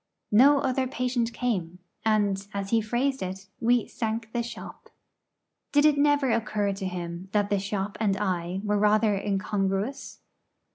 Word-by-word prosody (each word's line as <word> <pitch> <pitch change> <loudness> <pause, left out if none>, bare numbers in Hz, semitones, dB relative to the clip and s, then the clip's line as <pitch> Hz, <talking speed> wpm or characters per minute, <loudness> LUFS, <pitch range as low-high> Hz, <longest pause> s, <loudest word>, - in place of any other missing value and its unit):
No 270 +7 +7
other 260 0 0
patient 250 -2 -1
came; 195 -9 -2 0.3
and, 205 -3 +1
as 195 -1 -3
he 225 -1 +4
phrased 255 +5 -1
it, 190 +1 -5
we 240 -1 +3
'sank 225 0 -3
the 240 - 0
shop.' 235 0 -9 0.8
Did 290 0 +4
it 305 -1 +5
never 285 -2 +3
occur 215 -3 0
to 195 0 -5
him 175 0 -6
that 205 -1 +1
the 200 - +2
'shop' 200 0 -3
and 200 -3 +1
I 185 -2 -2
were 210 -1 +1
rather 210 0 +3
incongruous? 200 +5 -2
210 Hz, 150 wpm, -27 LUFS, 195-240 Hz, 0.8 s, No